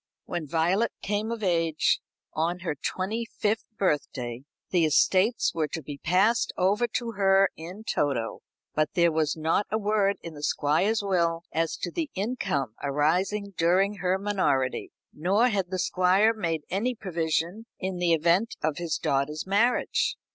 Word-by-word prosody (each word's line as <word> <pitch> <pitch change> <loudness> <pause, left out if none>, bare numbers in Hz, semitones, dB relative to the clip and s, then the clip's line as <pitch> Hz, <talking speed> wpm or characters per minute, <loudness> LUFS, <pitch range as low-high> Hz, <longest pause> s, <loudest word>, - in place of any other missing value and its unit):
When 170 -4 -4
Violet 175 +9 +1
came 210 +2 -1
of 230 -2 -4
age 165 -4 +2 0.3
on 170 +3 -1
her 170 -3 -2
twenty 190 +10 -3
fifth 220 -1 -2
birthday 130 -8 -1 0.3
the 175 -3 +3
estates 185 +8 +3
were 160 -2 0
to 160 +1 -6
be 140 0 -7
passed 195 - +2
over 205 +6 +2
to 235 -2 -4
her 195 -2 +4
in 180 +7 -9
toto; 135 - -1 0.3
but 155 -1 0
there 170 -1 +4
was 155 -1 0
not 160 +6 +1
a 215 - 0
word 205 -2 +1
in 165 - -7
the 145 - -10
Squire's 165 +10 +1
will 170 -4 +1
as 165 0 -1
to 175 - -4
the 320 - -2
income 190 - -2
arising 180 +9 0
during 190 +5 +2
her 185 0 +1
minority. 165 -11 0 0.2
Nor 200 +10 +2
had 195 -5 -1
the 185 - -2
Squire 185 +5 +3
made 165 -8 -2
any 230 +7 0
provision 175 +2 -2
in 185 -1 -3
the 175 -1 +2
event 170 +7 +2
of 155 0 0
his 170 -3 -1
daughter's 150 +1 -1
marriage. 235 - +2
180 Hz, 155 wpm, -27 LUFS, 160-205 Hz, 0.3 s, her